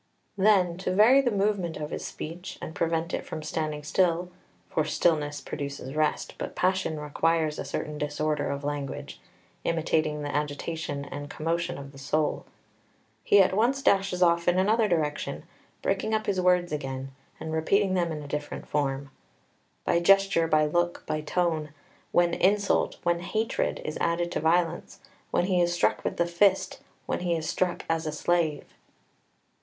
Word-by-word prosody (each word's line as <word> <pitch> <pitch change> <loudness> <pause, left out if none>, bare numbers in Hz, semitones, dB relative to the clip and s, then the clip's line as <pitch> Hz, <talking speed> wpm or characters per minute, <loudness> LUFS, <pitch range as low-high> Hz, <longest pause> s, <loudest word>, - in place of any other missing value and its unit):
2 195 - -6
Then, 185 -4 +4
to 185 - -2
vary 240 +7 +7
the 260 - +1
movement 200 -5 0
of 150 0 -5
his - - -4
speech, 170 +4 -7
and 160 - -7
prevent 165 +1 -1
it - - -2
from 155 - -6
standing 155 -1 -3
still 175 +3 +1 0.4
(for 155 - 0
stillness 150 -2 +1
produces 140 -2 -6
rest, 155 0 0
but - - -5
passion 185 -4 0
requires 155 +1 0
a - - -2
certain 150 -1 -4
disorder 150 0 -1
of 140 +1 -3
language, 145 -1 -4 0.4
imitating 155 -2 0
the 145 - -3
agitation 145 0 -3
and 145 0 -7
commotion 165 +3 -2
of 140 0 -9
the 135 - -13
soul), 150 +3 -1 0.8
he 200 -1 +6
at 185 - 0
once 255 +6 +2
dashes 195 -2 +3
off 170 -1 +3
in 175 +1 +4
another 215 +4 +3
direction, 155 -5 -1 0.4
breaking 220 - 0
up 215 - -1
his 190 -2 0
words 180 -2 +3
again, 135 -2 -4 0.3
and 160 - -5
repeating 190 +5 +2
them 175 -2 +1
in 150 -1 -5
a - - -8
different 150 +1 -5
form, 140 -1 -1 0.7
"by 170 - +3
gesture, 195 -2 +4
by 155 -1 +3
look, 175 +3 0
by 155 - -2
tone 160 -1 0 0.4
when 175 -1 +3
insult, 200 +3 +2
when 175 0 +2
hatred, 215 +6 -1
is 155 - -4
added 170 +1 0
to - - -1
violence, 170 +1 0 0.3
when 175 - +1
he 180 -2 +2
is 175 0 +2
struck 175 - +1
with - - -2
the 170 - +2
fist, 190 +3 +2 0.3
when - - -2
he 175 -1 0
is 160 -1 -3
struck 180 -1 -1
as 165 -1 -1
a - - -1
slave!" 155 -1 0
165 Hz, 170 wpm, -27 LUFS, 150-180 Hz, 0.8 s, vary